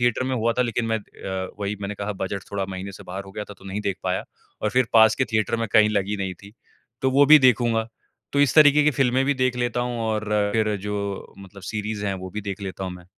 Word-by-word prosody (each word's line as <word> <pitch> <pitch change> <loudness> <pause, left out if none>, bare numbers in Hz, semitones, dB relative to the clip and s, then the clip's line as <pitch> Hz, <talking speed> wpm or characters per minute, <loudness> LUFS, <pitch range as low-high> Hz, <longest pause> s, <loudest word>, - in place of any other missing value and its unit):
Theatre 120 +1 +1
में 130 - -1
हुआ 115 +1 +1
था 125 +2 +1
लेकिन 120 -1 -1
मैं 110 0 0
अ, 95 -2 -6
वही 100 +1 -2
मैंने 100 +1 -4
कहा 105 +1 -4
बजट 100 +1 -3
थोड़ा 100 -1 -2
महीने 95 +1 -6
से - - -11
बाहर 95 +2 -6
हो 95 - -12
गया 105 - -5
था 105 - -11
तो - - -18
नहीं 95 +2 -4
देख 100 -2 -2
पाया। 90 0 -1 0.4
और 105 - +1
फिर 125 0 +2
पास 110 -1 +7
के - - +1
थिएटर 110 +1 +1
में 115 0 -1
कहीं 110 -2 +6
लगी 100 0 0
नहीं 95 -2 -3
थी, 100 +3 -15 0.5
तो 130 - +3
वो 140 +2 +5
भी 155 +2 +9
देखूँगा। 120 -4 +3 0.5
तो 140 - +2
इस 145 -3 +3
तरीके 150 -1 +7
की 150 - +5
फ़िल्में 130 -1 +2
भी 140 +1 +1
देख 130 -1 0
लेता 120 -1 -1
हूँ, 120 -1 -2
और 110 -1 -1 0.3
फिर 105 -2 +1
जो 100 0 -5
मतलब 100 0 -13
सीरीज़ 105 0 -4
है 100 - -1
वो 95 0 -7
भी 105 - -5
देख 100 -1 -5
लेता 95 0 -5
हूँ 95 - -4
मैं। 90 -1 -12
105 Hz, 260 wpm, -24 LUFS, 100-120 Hz, 0.5 s, भी